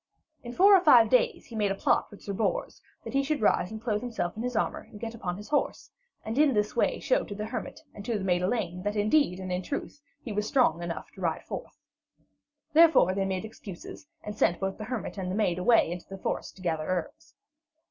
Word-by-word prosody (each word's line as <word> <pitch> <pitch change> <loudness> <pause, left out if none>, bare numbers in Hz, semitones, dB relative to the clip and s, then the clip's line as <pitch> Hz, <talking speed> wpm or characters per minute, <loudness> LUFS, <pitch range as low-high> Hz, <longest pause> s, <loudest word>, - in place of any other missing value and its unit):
In 240 - -6
four 390 +9 +7
or 375 - +5
five 240 -9 +6
days 255 - +2
he 235 - -11
made 210 -2 +1
a - - -1
plot - - +1
with 205 - -14
Sir 200 - -4
Bors, 365 - -2 0.2
that - - -7
he 275 - +3
should 290 +2 -1
rise 210 -4 +2
and 220 - -7
clothe 215 -2 -1
himself 225 -8 -3
in 220 - -5
his 250 0 -3
armour 220 - 0
and 210 - -12
get 230 0 -5
upon 185 -6 -4
his 210 +1 -10
horse, 295 - -1 0.3
and 225 +5 -2
in 295 -5 +4
this 210 0 0
way - - +1
show - - +1
to 205 - -7
the 210 +1 -4
hermit - - -5
and 205 - -9
to 230 -2 -1
the 195 - -4
maid 180 -2 +1
Elaine 180 -3 -1
that 205 +2 -2
indeed 210 - +2
and 185 -1 -5
in 180 0 -1
truth 285 +6 -5 0.2
he 235 - -6
was 210 0 -1
strong 230 - +2
enough 170 -2 -5
to 190 - -13
ride 165 -3 -1
forth. - - -7 1.0
Therefore 320 - +6
they 195 0 0
made 190 +1 -2
excuses 215 +4 -10 0.2
and 210 - -6
sent 175 -4 +2
both 195 +1 -3
the 215 - -5
hermit 225 -3 -4
and 185 -1 -3
the 185 - -2
maid 185 -5 +1
away 225 -3 +4
into 175 0 -6
the 195 - -7
forest - - -4
to 185 - -14
gather 160 -3 -1
herbs. 180 -3 -4
210 Hz, 240 wpm, -28 LUFS, 185-240 Hz, 1.0 s, four